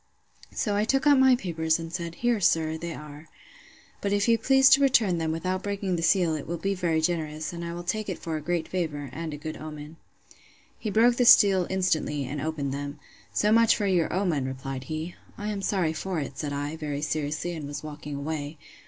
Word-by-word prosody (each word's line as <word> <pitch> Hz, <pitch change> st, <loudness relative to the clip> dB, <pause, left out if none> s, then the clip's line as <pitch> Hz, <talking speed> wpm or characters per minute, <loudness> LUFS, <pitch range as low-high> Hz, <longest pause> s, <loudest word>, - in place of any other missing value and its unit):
So 205 Hz, -2 st, -1 dB
I 205 Hz, -, +2 dB
took 270 Hz, +5 st, +1 dB
out 290 Hz, -2 st, +6 dB
my 265 Hz, -1 st, +6 dB
papers; 160 Hz, -7 st, 0 dB
and 165 Hz, 0 st, -7 dB
said, 170 Hz, -2 st, -4 dB
Here, 240 Hz, +1 st, +1 dB
sir, 160 Hz, -3 st, +2 dB
they 165 Hz, +1 st, -5 dB
are. 150 Hz, +1 st, -11 dB, 0.7 s
But 200 Hz, -, -1 dB
if 205 Hz, +2 st, +2 dB
you 230 Hz, -, +5 dB
please 265 Hz, +3 st, +5 dB
to 275 Hz, -, +7 dB
return 225 Hz, -10 st, +3 dB
them, 160 Hz, -1 st, -1 dB
without 185 Hz, +3 st, -2 dB
breaking 200 Hz, -2 st, -2 dB
the 165 Hz, -, -2 dB
seal, 175 Hz, -1 st, +3 dB
it 155 Hz, -, -4 dB
will 170 Hz, -, -3 dB
be 195 Hz, +3 st, -1 dB
very 170 Hz, -4 st, 0 dB
generous: 155 Hz, -1 st, -2 dB
and 170 Hz, 0 st, -6 dB
I 170 Hz, 0 st, -5 dB
will 175 Hz, -, -6 dB
take 215 Hz, +4 st, -2 dB
it 185 Hz, -, -3 dB
for 165 Hz, -1 st, -4 dB
a 155 Hz, -, -3 dB
great 170 Hz, +1 st, -1 dB
favour, 150 Hz, -7 st, -3 dB
and 165 Hz, +1 st, -5 dB
a 150 Hz, -, -5 dB
good 155 Hz, +1 st, -6 dB
omen. 155 Hz, 0 st, -9 dB, 0.8 s
He 215 Hz, -, -3 dB
broke 235 Hz, +3 st, +4 dB
the 245 Hz, -, +3 dB
seal 195 Hz, -5 st, +7 dB
instantly, 155 Hz, -6 st, 0 dB
and 140 Hz, +3 st, -4 dB
opened 145 Hz, -3 st, -2 dB
them: 145 Hz, +1 st, -5 dB, 0.3 s
So 210 Hz, -, +2 dB
much 230 Hz, 0 st, +5 dB
for 210 Hz, -, -1 dB
your 180 Hz, -4 st, +2 dB
omen! 175 Hz, -8 st, 0 dB
replied 130 Hz, 0 st, -5 dB
he. 155 Hz, +4 st, -4 dB, 0.2 s
I 210 Hz, +1 st, -3 dB
am 200 Hz, -1 st, -4 dB
sorry 185 Hz, -5 st, 0 dB
for 180 Hz, +1 st, -3 dB
it, 140 Hz, -2 st, -5 dB
said 145 Hz, 0 st, -4 dB
I, 145 Hz, +2 st, -3 dB
very 150 Hz, -2 st, -4 dB
seriously; 155 Hz, +3 st, -2 dB
and 155 Hz, -4 st, -6 dB
was 145 Hz, +1 st, -6 dB
walking 150 Hz, -1 st, -7 dB
away. 145 Hz, +1 st, -4 dB
165 Hz, 220 wpm, -27 LUFS, 150-195 Hz, 0.8 s, to